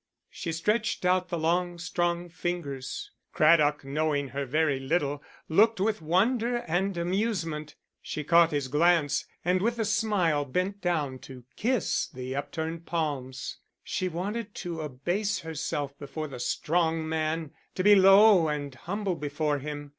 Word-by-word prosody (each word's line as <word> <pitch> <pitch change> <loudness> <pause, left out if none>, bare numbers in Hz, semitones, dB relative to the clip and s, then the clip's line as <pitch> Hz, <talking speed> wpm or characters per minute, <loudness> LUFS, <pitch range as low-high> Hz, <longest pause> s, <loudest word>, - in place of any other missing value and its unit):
She 170 - -4
stretched 185 +5 0
out 180 0 +2
the 170 - -2
long, 175 +2 0
strong 175 0 -1
fingers. 170 - -4 0.2
Craddock, 150 -2 +4
knowing 145 0 0
her 140 0 -4
very 150 0 +1
little, 140 +1 -1 0.3
looked 215 +6 +4
with 210 -1 0
wonder 225 +9 +2
and 190 -2 -1
amusement. 170 -5 -2 0.3
She 150 - -5
caught 170 +2 +5
his 145 -4 -1
glance, 155 +1 +2 0.2
and 180 +1 +2
with 235 +3 0
a 225 - 0
smile 195 -9 +1
bent 185 +8 -2
down 150 -8 -1
to 130 -2 -11
kiss 245 -2 0
the 130 +1 -6
upturned 160 +3 -4
palms. 145 -6 -3 0.3
She 185 - -2
wanted 205 +5 -4
to 170 -3 -5
abase 175 +9 -2
herself 150 -3 -3
before 155 +2 -5
the 130 -4 -8
strong 160 +4 0
man, 160 -1 -1 0.2
to 185 - -1
be 205 +1 +7
low 195 -2 +7
and 145 -2 -3
humble 195 - -3
before 150 -1 -1
him. 145 +1 -6
165 Hz, 145 wpm, -28 LUFS, 145-185 Hz, 0.3 s, be